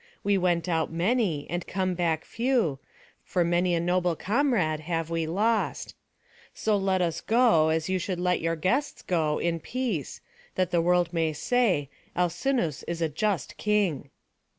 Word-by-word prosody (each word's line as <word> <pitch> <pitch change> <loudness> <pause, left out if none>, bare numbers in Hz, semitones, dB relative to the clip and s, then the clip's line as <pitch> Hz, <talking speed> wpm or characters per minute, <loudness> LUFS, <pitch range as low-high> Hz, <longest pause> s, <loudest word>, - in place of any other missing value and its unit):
We 200 0 +2
went 175 -2 +1
out 160 -3 0
many, 175 - 0
and 175 +1 -4
come 185 -1 -1
back 165 -3 -1
few, 230 - 0 0.4
for 180 - 0
many 175 +1 +2
a - - +1
noble 175 0 +1
comrade 205 - +1
have 165 0 -3
we 165 -1 -1
lost. 215 +6 0 0.6
So 215 -1 +1
let 190 -2 +1
us 165 -1 -2
go, 225 -10 +4
as 160 0 0
you 190 0 0
should 180 0 -3
let 180 0 +1
your 165 +1 0
guests 245 - -1
go, 155 -4 0
in 170 -1 -1
peace; 225 - -3 0.4
that 185 -1 0
the 170 -2 +3
world 175 0 +2
may 165 -2 +1
say, 190 - +1 0.3
'Alcinous 175 - 0
is 170 -1 -2
a 160 - +1
just 190 - -2
king.'" 195 -10 0
175 Hz, 160 wpm, -27 LUFS, 165-200 Hz, 0.6 s, go